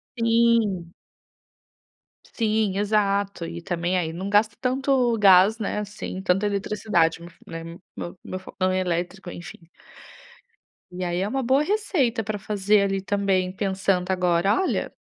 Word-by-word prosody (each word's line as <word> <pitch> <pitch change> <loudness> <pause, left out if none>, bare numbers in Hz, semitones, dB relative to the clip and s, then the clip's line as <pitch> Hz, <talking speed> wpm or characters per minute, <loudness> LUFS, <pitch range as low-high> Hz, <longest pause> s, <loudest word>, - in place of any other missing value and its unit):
Sim, 230 -7 +2 1.3
Sim, 215 -3 0
exato, 200 -3 0
e 170 +1 -7
também 175 +1 -1
aí 160 -2 -2
não 190 +3 -5
gasto 210 +1 +3
tanto 255 -2 +1
gás, 200 +3 +6
né, 210 0 -2
assim, 205 -2 -6
tanta 195 +2 +1
eletricidade, 200 -5 0 0.3
né, 165 0 -7 0.3
meu 175 - -7
meu 185 - -6
fogão 185 0 -2
é 185 - 0
elétrico, 180 +1 -3
enfim. 175 +1 -9 1.3
E 180 +1 -5
aí, 175 0 -1
é 195 - 0
uma 265 +4 -2
boa 265 +4 +3
receita 300 - 0
pra 210 0 -4
fazer 205 0 +2
ali 195 -1 0
também 195 -2 0
pensando 190 -1 -1
agora 180 +1 +2
olha. 380 - -1
195 Hz, 135 wpm, -24 LUFS, 185-215 Hz, 1.3 s, gás